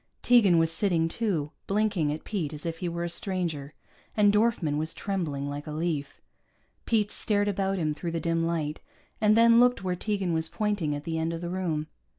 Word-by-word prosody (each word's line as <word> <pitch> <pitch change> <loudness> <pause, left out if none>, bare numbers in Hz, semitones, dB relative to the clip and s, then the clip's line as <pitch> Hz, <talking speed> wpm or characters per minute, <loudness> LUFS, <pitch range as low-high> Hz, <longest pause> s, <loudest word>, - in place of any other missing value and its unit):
Tegan 215 -8 +5
was 165 0 +3
sitting, 165 -2 +2
too, 165 -6 -2 0.2
blinking 200 -7 +1
at 155 - -5
Pete 170 -9 -3
as 150 +1 -7
if 165 -1 -3
he 175 - -2
were 170 0 -3
a - - -1
stranger, 170 -6 -2 0.4
and 205 -1 +5
Dorfman 210 -9 +2
was 160 +1 -3
trembling 160 -9 -3
like 145 +1 -5
a - - -5
leaf. 155 -3 -3 0.7
Pete 215 -3 +2
stared 205 -2 +1
about 195 -1 0
him 155 -4 0
through 170 +3 -5
the 165 0 -2
dim 165 0 0
light, 160 -2 -2 0.4
and 215 0 +4
then 230 0 +7
looked 245 -3 +4
where 180 -1 -1
Tegan 195 -2 -1
was 160 0 -1
pointing 205 -9 -1
at 145 - -6
the 160 +1 -2
end 165 +1 -1
of 165 - -5
the 175 0 -4
room. 170 -5 -1
170 Hz, 200 wpm, -27 LUFS, 155-205 Hz, 0.7 s, then